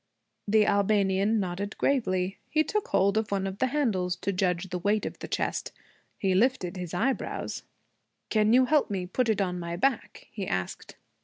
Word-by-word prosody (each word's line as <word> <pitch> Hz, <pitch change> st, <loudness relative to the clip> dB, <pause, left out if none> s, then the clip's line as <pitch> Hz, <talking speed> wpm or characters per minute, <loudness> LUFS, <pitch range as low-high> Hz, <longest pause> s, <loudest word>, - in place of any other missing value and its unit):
The 210 Hz, +1 st, +4 dB
Albanian 200 Hz, +1 st, +2 dB
nodded 195 Hz, +2 st, -3 dB
gravely. 190 Hz, -9 st, 0 dB
He 310 Hz, 0 st, +3 dB
took 425 Hz, +5 st, -2 dB
hold 200 Hz, +2 st, +3 dB
of 220 Hz, -, -3 dB
one 195 Hz, -1 st, -1 dB
of 195 Hz, +1 st, -5 dB
the 260 Hz, -, +3 dB
handles, 215 Hz, -11 st, 0 dB
to 200 Hz, -, -3 dB
judge 180 Hz, 0 st, 0 dB
the 180 Hz, -, -2 dB
weight 205 Hz, +4 st, +1 dB
of -, -, -6 dB
the -, -, -6 dB
chest. -, -, -2 dB, 0.5 s
He 190 Hz, -2 st, +1 dB
lifted 195 Hz, -3 st, +1 dB
his 180 Hz, -3 st, -5 dB
eyebrows. 265 Hz, +9 st, -2 dB, 0.7 s
'Can 215 Hz, -1 st, +3 dB
you 255 Hz, +2 st, +6 dB
help 295 Hz, +2 st, +2 dB
me 190 Hz, -3 st, -2 dB
put 230 Hz, +6 st, 0 dB
it 215 Hz, -2 st, +2 dB
on 180 Hz, -2 st, -1 dB
my 170 Hz, 0 st, -4 dB
back?' 255 Hz, +6 st, -1 dB
he 200 Hz, -4 st, -5 dB
asked. 90 Hz, 0 st, -4 dB
200 Hz, 180 wpm, -28 LUFS, 185-225 Hz, 0.7 s, you